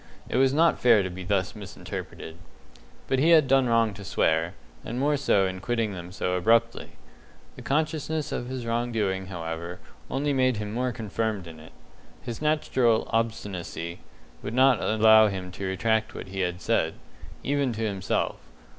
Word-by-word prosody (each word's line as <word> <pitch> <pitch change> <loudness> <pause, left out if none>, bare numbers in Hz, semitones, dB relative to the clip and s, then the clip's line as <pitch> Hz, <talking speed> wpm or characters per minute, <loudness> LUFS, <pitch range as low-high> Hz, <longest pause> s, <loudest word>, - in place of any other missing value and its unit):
It - - -1
was 135 0 +4
not 165 +4 +3
fair 115 -5 +5
to 95 - -4
be 95 +1 -7
thus 95 +1 -1
misinterpreted. 95 -4 -8 0.7
But 135 - +1
he 155 +5 +4
had 160 -5 +6
done 135 -1 +4
wrong 115 -2 +3
to 100 - -10
swear, 80 -3 +1 0.3
and 120 +2 -4
more 145 +2 +2
so 105 -8 +2
in 95 0 -3
quitting 115 0 -1
them 90 -1 -8
so 90 -1 -2
abruptly. 115 +5 +1 0.6
The - - -10
consciousness 155 +1 -1
of 120 - -3
his 130 -2 -5
wrong 120 +1 -1
doing, 95 -4 -1
however, 85 -1 -5 0.3
only 145 +2 0
made 130 -3 +2
him 105 0 -4
more 125 +2 0
confirmed 110 -3 -3
in 80 -1 -11
it. 80 +1 -13 0.5
His 120 +2 -7
native 155 0 0 0.4
obstinacy 95 -7 -3 0.4
would 110 - -5
not 130 -2 +5
allow 110 0 +6
him 95 -2 -4
to 95 +1 -5
retract 110 +3 0
what 95 - -7
he 95 0 -6
had 90 -1 -1
said - - +1 0.5
even 140 -2 0
to 110 - -5
himself. 95 -3 -1
110 Hz, 170 wpm, -26 LUFS, 95-130 Hz, 0.7 s, had